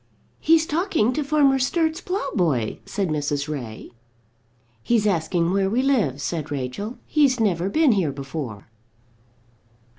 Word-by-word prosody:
"He's 320 0 +4
talking 315 - +1
to 300 - -1
Farmer 280 -2 +3
Sturt's 320 +5 0
ploughboy," 180 - -1
said 195 -4 -2
Mrs. 145 -1 -1
Ray. 125 -8 -6 0.9
"He's 225 - +1
asking 170 -2 +1
where 195 -1 +2
we 240 +5 +1
live," 220 - +1
said 160 0 -3
Rachel. 145 - -4
"He's 280 -5 +2
never 190 -4 +1
been 310 +4 +4
here 185 -9 +1
before." 135 -6 -6
195 Hz, 125 wpm, -23 LUFS, -, 0.9 s, He's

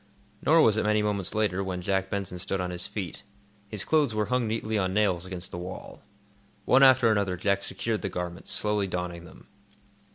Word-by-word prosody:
Nor 160 +1 +5
was 110 -1 +4
it - - +1
many 105 0 +2
moments 100 -3 -2
later 100 -3 +1
when 90 -2 -4
Jack 95 0 0
Benson 95 -3 -4
stood 95 +2 -2
on 90 -1 -2
his 90 0 -4
feet. 95 -6 -5 0.5
His 105 -2 -3
clothes 150 -8 +2
were 105 0 +1
hung 125 -2 +1
neatly 110 0 -2
on 95 -2 0
nails 95 -4 +1
against 90 -1 -7
the 85 - -5
wall. 90 +1 -8 0.6
One 130 - +5
after 130 -3 +6
another 100 -4 0
Jack 100 +2 +1
secured 110 +2 -2
the 95 - -2
garments, 90 -1 -5
slowly 105 -2 0
donning 90 -1 -4
them. 85 - -15
100 Hz, 195 wpm, -27 LUFS, 90-110 Hz, 0.6 s, after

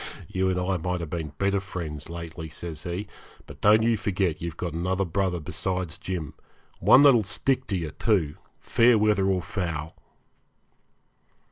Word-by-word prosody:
'You 95 0 0
and 90 -1 0
I 90 +1 0
might 90 +2 -2
have 85 -3 -6
been 80 -4 -4
better 100 0 +1
friends 80 -6 -6
lately,' 85 -1 -7
says 80 0 -7
he; 90 +4 -3 0.4
'but - - -13
don't 110 +2 +6
you 115 0 +3
forget 95 -5 -1
you've 85 -1 -5
got 85 -3 -3
another 90 +3 0
brother 90 0 0
besides 90 +1 -3
Jim 85 -7 -4 0.5
one 135 - +7
that 140 -2 +8
will 120 - +4
stick 130 +7 0
to 100 - -1
you, 80 -4 -4
too, 85 -9 0 0.2
fair 115 0 +4
weather 105 -2 +3
or 95 -2 +1
foul.' 85 -6 -3
90 Hz, 165 wpm, -26 LUFS, 85-100 Hz, 0.5 s, that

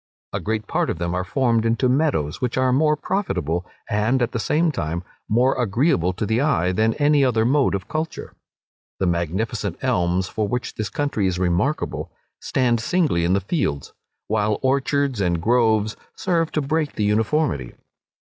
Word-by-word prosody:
A - - -1
great 110 0 -2
part - - 0
of - - -2
them 85 +1 -2
are 90 0 -1
formed 115 +3 +1
into 115 +3 +2
meadows, 125 - 0
which 125 -1 -1
are 130 -1 +3
more 150 +3 +3
profitable, 90 - -2 0.2
and, 110 +5 +1
at 120 - -1
the 115 - -2
same 160 +8 +1
time, 85 - -3 0.3
more 125 +5 +3
agreeable 105 - +2
to 100 - -3
the 110 +4 +1
eye 125 - +2
than 110 +4 +1
any 145 -1 +3
other 115 -4 +2
mode 135 -2 +2
of 95 -1 -5
culture. 160 +1 -4 0.6
The 95 - 0
magnificent 85 +5 -1
elms, 90 +1 +1
for 105 +1 -2
which 125 +4 -3
this 110 -2 -4
country 140 -9 -1
is 90 -1 -1
remarkable, 90 - -1 0.3
stand 120 -3 +1
singly 145 - +1
in 90 - +2
the 100 - +2
fields; 90 - -2 0.3
while 105 -1 +1
orchards 135 -2 +1
and 85 -3 +1
groves 110 +1 +2 0.2
serve 165 -3 0
to 155 - +1
break 155 +1 -1
the 105 - -1
uniformity. 105 - 0
110 Hz, 170 wpm, -22 LUFS, 95-140 Hz, 0.6 s, are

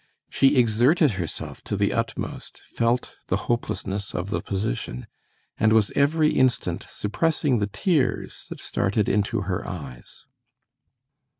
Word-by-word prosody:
She 135 +1 +4
exerted 125 +6 +4
herself 90 -5 -5
to - - -2
the - - +1
utmost, - - -4
felt 120 +1 0
the - - +1
hopelessness 100 -4 -2
of 90 +3 -3
the - - -1
position, 65 - -3 0.5
and 110 0 +4
was 110 -2 +4
every 150 +2 +3
instant 130 -2 +1
suppressing 140 +3 0
the 100 - 0
tears 155 - 0
that - - -7
started 100 +1 0
into 105 +2 +1
her 95 -2 -2
eyes. 70 -9 -9
110 Hz, 125 wpm, -25 LUFS, 100-135 Hz, 0.5 s, She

